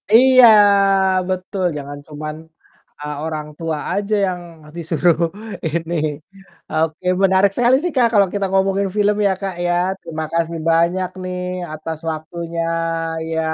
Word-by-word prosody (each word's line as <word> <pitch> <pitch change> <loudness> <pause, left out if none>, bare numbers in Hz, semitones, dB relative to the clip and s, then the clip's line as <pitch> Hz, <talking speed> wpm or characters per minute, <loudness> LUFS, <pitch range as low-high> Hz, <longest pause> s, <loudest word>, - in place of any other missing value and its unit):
Iya, 255 0 +7 0.8
betul, 185 +1 -3
jangan 145 0 -7
cuman, 155 0 -6 0.6
eee, 150 0 -5
orang 155 -1 -4
tua 160 -2 -2
aja 205 +1 -1
yang 180 -1 -3 0.3
disuruh 170 0 +1 0.5
ini 165 +2 -3 0.8
oke 160 +2 -1 0.2
menarik 190 +1 +4
sekali 245 +1 +4
sih 355 - -1
Kak, 250 -3 +4
kalo 200 -2 +5
kita 200 -1 -1
ngomongin 195 +1 +1
film 210 0 +3
ya 190 - +2
Kak 195 -2 -3
ya. 175 - +1 0.3
Terima 160 -1 -5
kasih 165 0 -1
banyak 175 +3 +2
nih 180 0 -4 0.3
atas 160 +1 -5
waktunya, 165 +2 -5 0.6
iya 160 0 -3
170 Hz, 135 wpm, -19 LUFS, 160-195 Hz, 0.8 s, Iya